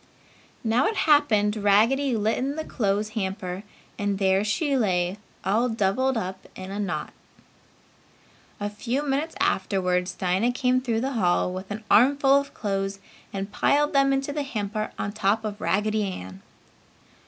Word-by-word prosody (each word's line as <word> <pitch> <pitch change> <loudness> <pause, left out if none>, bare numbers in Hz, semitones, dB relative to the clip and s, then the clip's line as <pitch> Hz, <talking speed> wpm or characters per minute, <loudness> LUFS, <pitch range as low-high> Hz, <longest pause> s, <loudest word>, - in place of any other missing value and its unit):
Now 235 +3 +2
it 440 - -1
happened 225 -9 +4
Raggedy 230 +6 +3
lit 215 +1 +1
in 275 +3 -2
the 315 - -3
clothes 210 -1 -1
hamper 190 -3 -4 0.4
and 205 -1 0
there 190 0 +2
she 280 +7 0
lay 185 -5 0 0.3
all 220 +6 +2
doubled 225 +4 +1
up 190 -2 -5
in 185 0 -7
a 200 - -4
knot. 200 -3 -3 1.5
A 205 - -2
few 235 +7 -2
minutes 290 +3 -1
afterwards 180 -1 0
Dinah 190 +7 +1
came 255 0 +1
through 230 -3 -1
the 265 +2 -1
hall 180 -4 +1
with 185 +1 -7
an 210 +1 -5
armful 275 +5 +5
of 280 0 -8
clothes 195 -1 -2 0.3
and 195 +1 -4
piled 295 +8 +2
them 275 -1 +4
in 270 0 +2
the 285 +2 -3
hamper 215 -5 -3
on 200 - -3
top 215 +1 0
of 210 -1 -5
Raggedy 210 +1 +1
Ann. 95 - -7
215 Hz, 155 wpm, -25 LUFS, 195-260 Hz, 1.5 s, armful